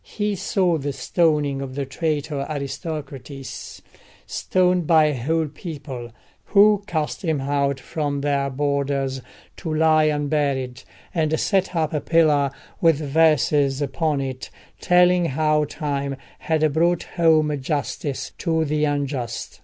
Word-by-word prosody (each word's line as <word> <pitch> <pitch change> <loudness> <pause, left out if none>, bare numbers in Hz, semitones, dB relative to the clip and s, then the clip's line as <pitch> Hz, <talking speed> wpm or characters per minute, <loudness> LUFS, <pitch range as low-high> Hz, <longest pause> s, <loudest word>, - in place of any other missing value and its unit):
He 210 -1 -2
saw 180 -3 +1
the 140 0 -3
stoning 150 -4 +1
of 130 -1 -6
the 140 -1 -2
traitor 145 0 -2
Aristocrates—stoned 150 +4 -3
by 160 -2 +6
a 150 -2 +1
whole 160 +2 +1
people, 145 -6 -7 0.4
who 205 0 +5
cast 155 -5 -2
him 160 -4 0
out 140 0 0
from 145 -1 -3
their 140 -1 0
borders 140 -1 -1 0.4
to 165 - -5
lie 155 0 +4
unburied, 145 -4 0 0.3
and 160 -2 +1
set 190 -2 +1
up 160 -1 0
a 150 - 0
pillar 150 -2 +3 0.3
with 165 -3 +5
verses 150 -2 +2
upon 145 +1 -1
it 130 -1 -5 0.3
telling 180 0 +4
how 155 0 +1
Time 140 -2 -3 0.2
had 155 -2 +1
brought 170 +2 +2
home 160 -3 +2
justice 135 0 -3
to 160 -2 +1
the 150 0 +1
unjust. 140 -4 -3
150 Hz, 125 wpm, -22 LUFS, 140-160 Hz, 0.4 s, by